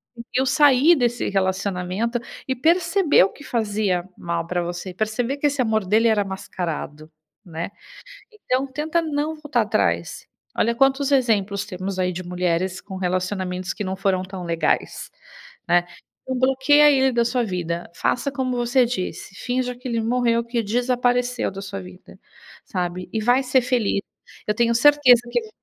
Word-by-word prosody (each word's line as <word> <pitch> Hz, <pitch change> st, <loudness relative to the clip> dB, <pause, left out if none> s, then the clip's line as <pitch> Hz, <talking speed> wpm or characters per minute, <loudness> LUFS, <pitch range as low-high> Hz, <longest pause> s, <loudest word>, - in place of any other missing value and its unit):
conseguiu 245 Hz, +3 st, -2 dB
sair 290 Hz, +3 st, +5 dB
desse 240 Hz, -3 st, 0 dB
relacionamento 195 Hz, +3 st, -1 dB, 0.3 s
e 260 Hz, -, 0 dB
percebeu 330 Hz, -, +3 dB
que 290 Hz, -, -14 dB
fazia 205 Hz, -7 st, -1 dB
mal 170 Hz, -1 st, -3 dB
pra 175 Hz, 0 st, -1 dB
você, 175 Hz, +2 st, -5 dB
perceber 230 Hz, +7 st, -2 dB
que 290 Hz, -, +2 dB
esse 285 Hz, -2 st, 0 dB
amor 220 Hz, -3 st, +1 dB
dele 220 Hz, +4 st, +3 dB
era 210 Hz, -2 st, +2 dB
mascarado, 165 Hz, -5 st, -5 dB, 0.3 s
né. 170 Hz, +2 st, -5 dB, 0.6 s
Então 270 Hz, -10 st, -1 dB
tenta 300 Hz, +5 st, -1 dB
não 310 Hz, 0 st, -2 dB
voltar 295 Hz, -6 st, -1 dB
atrás. 85 Hz, -, -1 dB, 0.3 s
Olha 235 Hz, +1 st, +2 dB
quantos 270 Hz, +2 st, +2 dB
exemplos 205 Hz, -6 st, +1 dB
temos 190 Hz, 0 st, -5 dB
aí 180 Hz, 0 st, +1 dB
de 185 Hz, +1 st, -6 dB
mulheres 180 Hz, +1 st, -1 dB
com 190 Hz, -2 st, -9 dB
relacionamentos 185 Hz, 0 st, -2 dB
que 205 Hz, -, -4 dB
não 190 Hz, 0 st, -2 dB
foram 190 Hz, -1 st, 0 dB
tão 185 Hz, -1 st, -8 dB
legais, 165 Hz, -2 st, -1 dB, 0.6 s
né. 175 Hz, 0 st, +4 dB, 0.4 s
Então 260 Hz, -1 st, -3 dB
bloqueia 270 Hz, +3 st, +5 dB
ele 265 Hz, -2 st, +3 dB
da 235 Hz, 0 st, +2 dB
sua 245 Hz, +1 st, 0 dB
vida. 175 Hz, -4 st, -4 dB
Faça 280 Hz, +9 st, 0 dB
como 255 Hz, -3 st, -2 dB
você 240 Hz, +1 st, +2 dB
disse, 195 Hz, -4 st, -5 dB
finja 250 Hz, 0 st, -2 dB
que 250 Hz, +1 st, -8 dB
ele 230 Hz, -1 st, 0 dB
morreu, 235 Hz, 0 st, +1 dB
que 235 Hz, -1 st, -2 dB
desapareceu 245 Hz, +2 st, 0 dB
da 195 Hz, 0 st, -8 dB
sua 140 Hz, -, -6 dB
vida, 90 Hz, 0 st, -13 dB, 0.5 s
sabe. 180 Hz, 0 st, -4 dB
E 220 Hz, -, -1 dB
vai 245 Hz, +4 st, +3 dB
ser 255 Hz, 0 st, +3 dB
feliz. 240 Hz, -5 st, 0 dB, 0.5 s
Eu 210 Hz, -, +1 dB
tenho 235 Hz, +1 st, +2 dB
certeza 260 Hz, -2 st, +6 dB
que 240 Hz, -, +1 dB
eu 220 Hz, -, -11 dB
230 Hz, 160 wpm, -22 LUFS, 185-255 Hz, 0.6 s, certeza